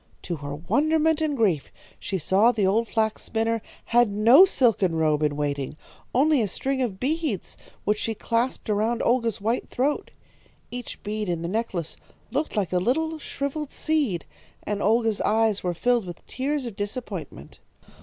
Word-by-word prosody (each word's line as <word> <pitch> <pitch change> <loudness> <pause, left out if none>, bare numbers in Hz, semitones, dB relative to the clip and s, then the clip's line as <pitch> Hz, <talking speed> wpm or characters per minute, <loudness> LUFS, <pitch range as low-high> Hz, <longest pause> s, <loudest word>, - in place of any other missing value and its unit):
To 170 - -3
her 145 0 -5
wonderment 310 - +2
and 300 -3 0
grief 185 - +1 0.3
she 195 - -3
saw 195 +8 +4
the 215 -5 0
old 220 +5 +2
flax 220 -1 0
spinner 225 0 -1 0.2
had 240 -1 +4
no 230 - +7
silken 220 - +2
robe 155 -2 +2
in 150 -1 +1
waiting, 145 -1 -2 0.4
only 290 +1 +4
a 215 - +1
string 265 +8 -2
of 210 -7 -2
beads 290 - -2 0.3
which 210 +1 +1
she 225 - -2
clasped 235 +4 -1
around 220 +3 +1
Olga's 235 -3 +1
white 225 +4 -1
throat. 280 +4 -1 0.6
Each 245 -1 -7
bead 210 -1 -3
in 170 -1 -2
the - - -2
necklace 190 -5 -3 0.3
looked 300 -2 -1
like 195 -4 -1
a 180 - +3
little 315 - 0
shrivelled 280 +1 -4
seed, 285 - 0 0.4
and 205 -1 -2
Olga's 225 0 +2
eyes 220 -1 +2
were 175 -1 -1
filled 240 +3 +2
with 175 -2 -9
tears 275 +1 -2
of 230 -4 -6
disappointment. 205 +5 -6
225 Hz, 165 wpm, -25 LUFS, 190-260 Hz, 0.6 s, no